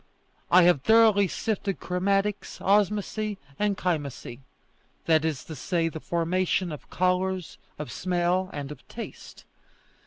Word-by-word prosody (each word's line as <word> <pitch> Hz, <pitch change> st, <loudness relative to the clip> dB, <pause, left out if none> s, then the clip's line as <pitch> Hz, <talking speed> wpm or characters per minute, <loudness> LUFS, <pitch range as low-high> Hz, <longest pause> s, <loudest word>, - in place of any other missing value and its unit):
I 180 Hz, +1 st, +7 dB
have 175 Hz, -6 st, +4 dB
thoroughly 220 Hz, 0 st, +5 dB
sifted 200 Hz, 0 st, -2 dB
chromatics, 195 Hz, +3 st, -1 dB
osmosy, 210 Hz, +1 st, +1 dB, 0.2 s
and 205 Hz, -2 st, +1 dB
chymosy 145 Hz, -8 st, -3 dB, 0.7 s
that 160 Hz, -2 st, +4 dB
is 155 Hz, -5 st, -2 dB
to 160 Hz, -, -8 dB
say, 165 Hz, +1 st, 0 dB
the 160 Hz, -, -7 dB
formation 175 Hz, +2 st, 0 dB
of 150 Hz, -, -9 dB
colours, 185 Hz, 0 st, -1 dB, 0.2 s
of 150 Hz, -, -6 dB
smell, 180 Hz, +1 st, 0 dB
and 145 Hz, -1 st, -6 dB
of 150 Hz, -, -11 dB
taste." -, -, -9 dB
180 Hz, 125 wpm, -26 LUFS, 165-200 Hz, 0.7 s, I